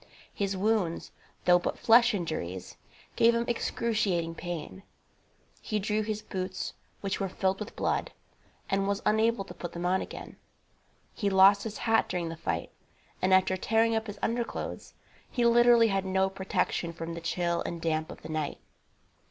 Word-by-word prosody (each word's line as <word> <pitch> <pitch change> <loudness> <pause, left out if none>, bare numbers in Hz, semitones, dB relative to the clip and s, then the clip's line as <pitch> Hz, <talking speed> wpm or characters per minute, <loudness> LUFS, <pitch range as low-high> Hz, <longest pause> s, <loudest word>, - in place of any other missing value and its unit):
His 195 -1 -2
wounds, 200 -4 0 0.3
though 180 0 +6
but - - -3
flesh 235 0 +5
injuries, 125 - -4 0.4
gave 235 +1 +5
him 235 0 0
excruciating 215 -8 0
pain. 175 +2 -6 0.8
He 215 - -2
drew 210 +1 0
his 215 0 -3
boots, 185 0 -4 0.3
which 195 -1 -2
were 195 - -1
filled 190 +1 0
with 210 +1 -7
blood, - - -1 0.6
and 195 0 0
was 200 0 -1
unable 220 -1 +2
to - - -10
put 175 - -7
them 175 +1 -4
on 185 +1 +2
again. - - -8 0.8
He 205 - -1
lost 195 +1 +6
his 220 -1 -5
hat 225 -1 +2
during 175 -2 -2
the 165 - -5
fight, 85 - -3 0.5
and, 185 - +2
after 185 0 +4
tearing 225 +4 +2
up 220 0 -1
his 205 0 -7
underclothes, 235 +1 -3 0.3
he 240 -2 0
literally 235 -1 +6
had 195 -1 0
no 190 0 +1
protection 190 -3 -1
from 165 0 -5
the 170 - -6
chill 170 0 -1
and 170 - -4
damp 160 -1 -1
of - - -12
the 155 - -8
night. 155 -2 -2
195 Hz, 165 wpm, -29 LUFS, 175-220 Hz, 0.8 s, though